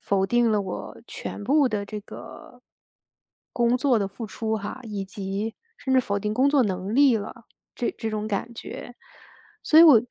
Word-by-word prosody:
否 195 -1 +1
定 240 +2 +3
了 210 -1 +2
我 195 - -6
全 - - -6
部 280 +6 +4
的 210 -4 -2
这 210 +1 -5
个 245 +3 -12 0.9
工 240 0 +2
作 265 -3 +3
的 200 -3 0
付 220 +4 -7
出 220 +1 -2
哈， 205 +5 -6
以 210 -4 -4
及 195 +3 -4 0.2
甚 265 -1 -1
至 260 - +6
否 200 -4 -1
定 210 +1 -2
工 270 +4 +3
作 280 -3 +4
能 190 0 -3
力 270 -1 +5
了， 215 +2 -7 0.3
这 240 - -1
这 225 -2 -3
种 215 0 -3
感 215 +3 -3
觉。 245 +1 -8 0.7
所 315 - +5
以 335 - +11
我 275 -9 +8
220 Hz, 200 characters per minute, -25 LUFS, 200-245 Hz, 0.9 s, 以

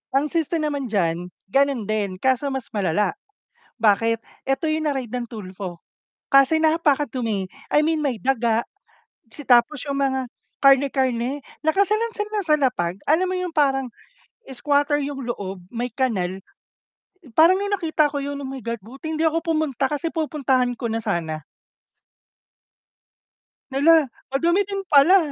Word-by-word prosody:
Ang 290 +2 +1
siste 330 0 0
naman 290 -4 -1
diyan, 175 -4 -1 0.2
gano'n 275 -4 +2
din, 205 -2 -2
kaso 260 +6 +1
mas 265 -2 -4
malala, 200 -1 +1 0.7
bakit? 225 0 +3 0.3
'Eto 270 +3 0
'yong 310 -1 0
na-raid 260 -5 -3
ng 245 -2 -3
Tulfo 185 -5 -8 0.5
kasi 275 +4 +5
napakadumi. 265 - +1 0.2
I 300 - +5
mean, 320 +1 +1
may 270 -7 -2
daga, 235 -3 +1 0.7
si 290 +5 -10
tapos 250 +3 +3
'yong 280 -1 -2
mga 265 -1 +1 0.4
karne-karne, 270 -1 +3 0.2
nakasalansan 420 +6 0
lang 415 -2 -1
sa 305 - +5
lapag. 215 - 0
Alam 340 +5 +2
mo 370 - -1
'yong 365 -2 -3
parang 270 -5 +1 0.6
squatter 285 +3 +1
'yong 275 -3 -5
loob, 195 -5 -4
may 240 +3 -4
kanal. 195 -8 -1 0.9
Parang 330 +8 +6
nung 405 +1 -2
nakita 320 -6 +1
ko 285 - -2
'yon, 285 +1 -4
oh, 270 - -5
my 270 0 -6
God! 230 -1 -3
Buti 270 +7 -9
hindi 320 - 0
ako 325 +1 +2
pumunta 310 -5 0
kasi 300 +3 -3
pupuntahan 265 -6 0
ko 230 -1 -3
na 225 - -1
sana. 160 -6 -2 2.3
Hala, 300 +2 +5 0.2
madumi 340 +8 +2
din 395 -1 -3
pala. 300 +7 +7
270 Hz, 140 wpm, -23 LUFS, 230-310 Hz, 2.3 s, pala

